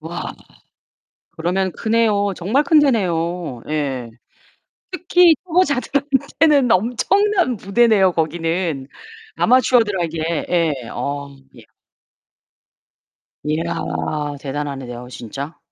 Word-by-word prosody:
와. 165 +2 -6 1.0
그러면 180 +3 0
크네요. 215 -3 +1
정말 220 +12 +1
큰 315 -1 +5
데내요. 175 - 0
예. 135 -6 -2 0.8
특히 355 -1 +4
초보자들한테는 285 -4 +2
엄청난 335 - +2
무대네요. 200 -2 +3
거기는. 165 -3 -2 0.5
아마추어들에게 190 -11 +2
예. 165 -3 +2 0.2
어. 140 0 -4 2.3
야 170 +1 -2 0.7
대단하네. 140 -1 -4
내가 120 0 -8
진짜. 135 +7 -7
185 Hz, 195 characters per minute, -19 LUFS, 160-255 Hz, 2.3 s, 큰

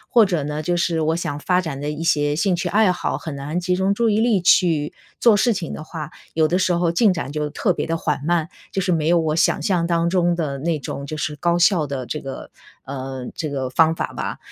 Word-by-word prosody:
或 230 - +8
者 175 -7 -1
呢， 150 +1 -4
就 175 +2 0
是 170 -2 0
我 160 +1 +1
想 165 -3 -3
发 180 +4 +1
展 150 -6 -4
的 145 - -2
一 150 +1 -5
些 150 -2 +1
兴 185 0 +2
趣 180 +1 -2
爱 210 +2 +4
好， 180 - -1
很 155 -3 -6
难 145 +5 -3
集 180 +1 0
中 190 +2 +1
注 230 +1 +1
意 215 +1 +2
力 230 -4 +3
去 165 -4 +3 0.3
做 230 -3 +5
事 235 +4 +3
情 180 -6 -3
的 - - -6
话， 155 -1 -7 0.2
有 160 -1 +3
的 175 - +1
时 185 -1 +1
候 170 0 +2
进 195 +5 +3
展 170 -6 -3
就 150 -1 -2
特 185 +5 0
别 - - -3
地 165 0 -1
缓 150 -4 -1
慢， 170 -1 +1 0.2
就 195 - -1
是 180 -2 +1
没 160 0 +1
有 175 - +4
我 155 -1 0
想 165 +2 +2
象 180 -4 +1
当 170 0 +1
中 175 -1 +2
的 155 -5 -2
那 160 +1 -1
种 140 +1 -6
就 155 +2 -5
是 150 0 -3
高 170 +3 +1
效 175 -3 +4
的 135 -3 -4
这 150 - -4
个 135 -1 -7 0.4
呃， 130 -1 -6
这 155 - -3
个 135 -2 -3
方 160 +4 +3
法 - - -4
吧。 - - -4
165 Hz, 275 characters per minute, -21 LUFS, 150-180 Hz, 0.4 s, 或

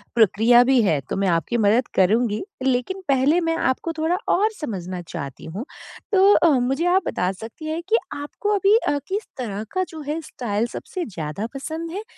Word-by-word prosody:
प्रक्रिया 230 +3 +5
भी 260 -1 +4
है, 160 -9 +2
तो - - -5
मैं 195 0 0
आपकी 175 +7 +1
मदद 220 +4 +3
करूँगी 215 - +2 0.2
लेकिन 265 +9 0
पहले 275 +5 +3
मैं 330 0 0
आपको 260 +5 0
थोड़ा 320 +3 0 0.2
और 420 +4 +3
समझना 185 - -5
चाहती 140 -5 -7
हूँ। 195 - -6 0.5
तो 395 +1 +6
अ, 335 - +5
मुझे 270 +7 0
आप 365 +2 +4
बता 180 +1 0
सकती 225 - -10
हैं 320 +2 -2
कि 455 - +5 0.2
आपको 290 +8 -4
अभी 395 +2 +4
अ, 290 - +2
किस 405 +2 -3
तरह 210 -5 -4
का 370 0 0
जो 320 -2 -8
है 305 +2 -1
स्टाइल 225 -6 -2
सबसे 360 +8 -5
ज़्यादा 170 +1 -5
पसंद 320 +4 -5
है, 400 +5 -5
255 Hz, 185 wpm, -22 LUFS, 205-330 Hz, 0.5 s, तो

